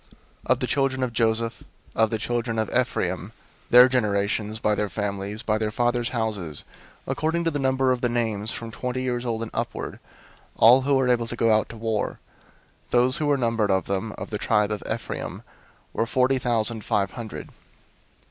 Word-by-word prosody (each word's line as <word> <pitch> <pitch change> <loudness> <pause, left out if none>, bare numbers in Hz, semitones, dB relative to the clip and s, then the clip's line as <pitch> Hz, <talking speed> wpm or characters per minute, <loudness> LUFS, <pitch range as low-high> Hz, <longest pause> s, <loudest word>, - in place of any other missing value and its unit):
001:032 - - -30 0.4
Of - - -6
the - - +2
children 135 -1 0
of 125 -2 -2
Joseph, 115 0 0 0.3
of 110 -1 +3
the 110 - -1
children 115 +1 -2
of 110 -2 -1
Ephraim, 95 -5 -1 0.4
their 125 +1 +9
generations, 105 -3 0
by 105 -1 +1
their 105 -1 -1
families, 100 +2 -3
by 110 0 0
their 110 -1 0
fathers' 120 +1 0
houses, 105 - -2 0.4
according 165 +2 -1
to 165 - +1
the 145 - -2
number 130 -1 +2
of 125 -1 0
the 125 - +1
names, 110 -3 -1
from 115 0 -5
twenty 125 +3 -3
years 125 -1 -2
old 115 -1 -1
and 115 - -7
upward, - - -4 0.6
all 125 +4 +7
who 140 +1 +2
were 130 -1 +2
able 120 -2 +2
to 120 - -5
go 115 -1 +3
out 110 - 0
to 115 - -9
war; 110 -1 -2 0.7
001:033 - - -35
those 125 +1 +3
who 150 - -1
were 145 -1 +3
numbered 115 -4 +1
of 95 -1 +2
them, 100 +3 -2
of - - -7
the 105 - -2
tribe 105 -2 +2
of 105 - -2
Ephraim, 115 0 -4 0.5
were 115 - 0
forty 130 +3 +2
thousand 115 -2 0
five 100 -1 0
hundred. 115 -2 -7
115 Hz, 195 wpm, -25 LUFS, 105-125 Hz, 0.7 s, their